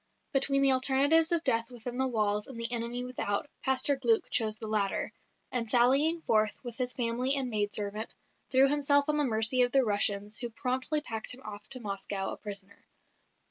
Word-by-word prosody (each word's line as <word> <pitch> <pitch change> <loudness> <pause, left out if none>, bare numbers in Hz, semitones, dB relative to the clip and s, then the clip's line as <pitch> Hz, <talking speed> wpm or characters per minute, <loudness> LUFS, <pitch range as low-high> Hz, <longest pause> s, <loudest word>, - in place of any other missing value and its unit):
Between 275 0 +2
the 275 - +5
alternatives 280 +6 +5
of 335 -1 +1
death 230 -4 +1
within 245 0 -7
the 265 - +1
walls 210 -3 -1
and 255 -4 -10
the 230 0 +1
enemy 240 +1 -2
without, 245 -2 -3 0.2
Pastor 265 +2 +1
Glück 235 -4 0
chose 220 -2 +1
the 220 - -8
latter; 210 -2 -2 0.4
and 235 -3 -2
sallying 275 +8 +3
forth 215 -1 +1
with 240 -2 -8
his 250 -2 -2
family 250 +3 0
and 260 -3 -3
maid 205 -1 -1
servant, 210 +1 -3 0.3
threw 265 +1 +4
himself 285 0 +3
on 300 - +1
the 295 - +1
mercy 225 0 +2
of 245 0 +2
the 270 -1 +2
Russians 205 0 +1
who 240 - -2
promptly 260 +5 -2
packed 225 -2 -4
him 260 - -17
off 210 0 -10
to 260 - -1
Moscow 195 -2 -4
a - - -7
prisoner. 200 -1 -9
245 Hz, 190 wpm, -29 LUFS, 215-270 Hz, 0.4 s, the